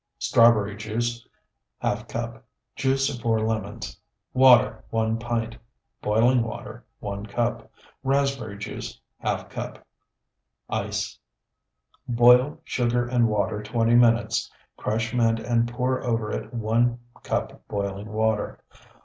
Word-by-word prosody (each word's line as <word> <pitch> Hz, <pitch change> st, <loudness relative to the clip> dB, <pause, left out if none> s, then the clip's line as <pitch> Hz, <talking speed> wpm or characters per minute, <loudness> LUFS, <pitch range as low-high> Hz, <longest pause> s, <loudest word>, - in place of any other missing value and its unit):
Strawberry 110 Hz, -3 st, +4 dB
juice, 115 Hz, +2 st, -3 dB, 0.6 s
½ -, -, -1 dB
cup. 115 Hz, +1 st, -5 dB, 0.3 s
Juice 135 Hz, +1 st, +1 dB
of 120 Hz, -, -10 dB
4 115 Hz, -1 st, +1 dB
lemons. 110 Hz, -1 st, -3 dB, 0.3 s
Water, 130 Hz, -2 st, +6 dB
1 115 Hz, 0 st, 0 dB
pint. 115 Hz, -1 st, -2 dB, 0.4 s
Boiling 120 Hz, +4 st, +3 dB
water, 115 Hz, -1 st, -6 dB, 0.2 s
1 100 Hz, +1 st, -5 dB
cup. 120 Hz, +3 st, -2 dB, 0.3 s
Raspberry 135 Hz, -6 st, 0 dB
juice, 105 Hz, -, -6 dB, 0.2 s
½ -, -, -2 dB
cup. -, -, -6 dB, 0.9 s
Ice. -, -, -2 dB, 0.9 s
Boil 125 Hz, +5 st, +5 dB
sugar 120 Hz, -3 st, 0 dB
and 120 Hz, -1 st, +3 dB
water 105 Hz, 0 st, 0 dB
twenty 115 Hz, +2 st, +1 dB
minutes; 115 Hz, -1 st, +3 dB, 0.3 s
crush 115 Hz, +1 st, -2 dB
mint 115 Hz, -2 st, +2 dB
and 120 Hz, 0 st, +1 dB
pour 130 Hz, +1 st, -1 dB
over 115 Hz, -3 st, -1 dB
it -, -, -4 dB
one 120 Hz, +1 st, +1 dB, 0.2 s
cup -, -, -3 dB
boiling 100 Hz, 0 st, -4 dB
water. 110 Hz, -1 st, 0 dB
115 Hz, 115 wpm, -25 LUFS, 110-120 Hz, 0.9 s, Water